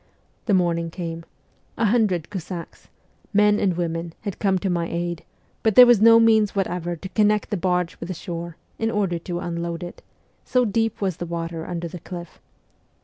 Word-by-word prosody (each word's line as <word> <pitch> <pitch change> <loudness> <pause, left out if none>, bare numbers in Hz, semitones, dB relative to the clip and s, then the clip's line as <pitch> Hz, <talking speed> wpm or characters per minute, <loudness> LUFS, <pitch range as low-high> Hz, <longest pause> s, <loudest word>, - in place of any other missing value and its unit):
The 205 - +4
morning 170 -2 +1
came; 165 -1 -6 0.5
a 230 - +1
hundred 205 -7 +1
Cossacks 180 -3 -7 0.5
men 210 0 +4
and 190 -3 +2
SIBERIA 170 -1 -1
219 - - -4
women 170 -1 -10
had 200 -3 -5
come 195 -2 +2
to 190 - -2
my 170 -1 0
aid, 170 -1 -3 0.4
but 220 -3 +1
there 250 - +11
was 240 -4 +5
no 230 +1 +8
means 220 -3 +4
whatever 175 -3 -1
to 190 +3 -8
connect 210 0 +2
the 205 - 0
barge 180 -1 -1
with - - -6
the 185 - -4
shore, 170 0 -6 0.2
in 225 - 0
order 195 -6 0
to 175 +1 -4
unload 170 0 -4
it 175 - -9 0.4
so 250 -1 +2
deep 225 +1 -1
was 190 -4 -1
the 175 - -5
water 165 -1 -4
under 170 -1 -4
the 175 +1 -8
cliff. 175 0 -9
180 Hz, 195 wpm, -23 LUFS, 170-210 Hz, 0.5 s, there